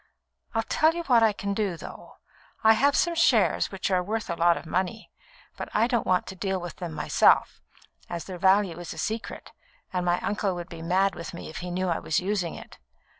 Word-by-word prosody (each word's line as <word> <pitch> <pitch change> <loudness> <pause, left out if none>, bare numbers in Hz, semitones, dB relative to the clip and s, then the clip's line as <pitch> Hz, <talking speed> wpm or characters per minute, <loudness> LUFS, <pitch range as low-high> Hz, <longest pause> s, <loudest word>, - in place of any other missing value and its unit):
I'll 225 - +2
tell 315 +7 +2
you 340 - -3
what 245 -7 +4
I 220 -1 +5
can 200 0 -3
do, 200 -4 -1
though. - - -11 0.5
I 220 0 +7
have 280 +6 +3
some 345 - +2
shares 265 -10 +3
which 195 0 -3
are 185 -1 +3
worth 215 +1 -3
a - - -1
lot 170 0 +3
of - - -8
money, 190 +6 -3 0.4
but - - -6
I 215 - +4
don't 240 -2 0
want 180 -1 +2
to 190 - -8
deal 190 0 -2
with 175 -2 -7
them 175 -2 -5
myself, - - +3 0.5
as 170 -1 -5
their 185 -2 -7
value 190 -2 +3
is 175 -2 -7
a - - -13
secret, 215 +4 -4 0.4
and 180 -1 0
my 175 0 +1
uncle 200 -2 -1
would 175 0 -7
be 165 -2 -9
mad 190 +4 +2
with 170 +1 -7
me 170 - -8
if - - -8
he 180 - -6
knew 185 +1 -1
I 170 - 0
was 155 - 0
using 185 -3 -2
it. - - -12
190 Hz, 225 wpm, -26 LUFS, 175-220 Hz, 0.5 s, I